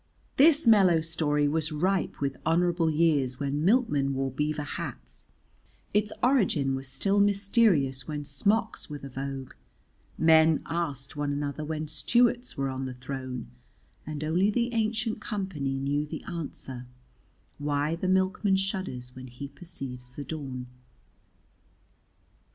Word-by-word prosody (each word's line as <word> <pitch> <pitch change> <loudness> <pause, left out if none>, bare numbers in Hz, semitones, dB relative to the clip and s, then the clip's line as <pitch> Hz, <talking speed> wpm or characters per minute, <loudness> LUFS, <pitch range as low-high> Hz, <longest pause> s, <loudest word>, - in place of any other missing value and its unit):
This 300 +1 +6
mellow 195 -7 +6
story 150 -2 +1
was 155 +1 0
ripe 185 +6 0
with 140 -1 -1
honourable 170 0 +2
years 150 -5 +2
when 145 +1 -1
milkmen 165 - +2
wore 135 0 -1
beaver 150 +2 -1
hats, 145 - -6 0.7
its 210 +1 +2
origin 190 - +3
was 135 0 -4
still 195 +10 +2
mysterious 200 - +3
when 150 -2 -4
smocks 205 - +1
were 150 - -5
the 140 -1 -9
vogue, 135 0 -5 0.6
men 160 -1 +5
asked 145 -4 -2
one 145 -1 -1
another 145 +1 -3
when 155 0 -3
Stuarts 240 +11 +2
were 135 0 0
on 130 0 -3
the 130 - -6
throne 130 - -6 0.5
(and 155 -1 -5
only 175 +6 +2
the 235 +2 0
Ancient 225 0 0
Company 180 - -3
knew 145 +2 -1
the - - -6
answer) 135 -6 -6 0.7
why 145 +2 0
the 180 +2 -3
milkman 190 +1 +2
shudders 185 - -3
when 130 0 -9
he 125 +3 -8
perceives 130 -6 -7
the 145 - -5
dawn. 135 -4 -5
150 Hz, 135 wpm, -28 LUFS, 135-190 Hz, 0.7 s, This